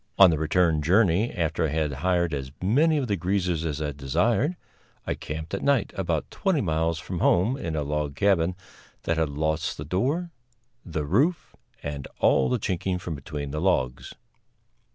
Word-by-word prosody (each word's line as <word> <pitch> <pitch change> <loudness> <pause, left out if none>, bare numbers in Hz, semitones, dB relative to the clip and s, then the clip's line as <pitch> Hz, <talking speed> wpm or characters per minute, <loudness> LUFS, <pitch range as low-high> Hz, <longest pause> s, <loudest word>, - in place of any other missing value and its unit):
On 95 -3 +8
the 80 - 0
return 80 0 +2
journey, 95 +5 +3
after 80 -3 -1
I - - +1
had 75 0 -1
hired 85 -2 +1
as 65 -2 -4
many 150 - +3
of 135 -4 -1
the 100 - +1
greasers 90 -2 0
as 75 -2 -2
I 75 -1 -2
desired, 90 - +1 0.5
I - - -1
camped 80 +3 -6
at 100 - -2
night 140 -6 +1
about 85 -6 -2
twenty 190 -6 0
miles 80 - 0
from 85 +2 -5
home, 95 +11 +3
in 85 - -4
a 75 - -1
log 75 -1 -2
cabin 90 -1 +2 0.5
that 85 - 0
had 80 -2 +1
lost 80 +2 -1
the 75 - -6
door, 140 - -1 0.5
the 80 -4 -3
roof 155 - +1 0.3
and 70 -1 -5
all 65 -2 +3
the - - +1
chinking 95 0 -2
from 90 -2 -5
between 70 0 -6
the 75 +2 -3
logs. 65 -9 0
85 Hz, 175 wpm, -26 LUFS, 75-95 Hz, 0.5 s, On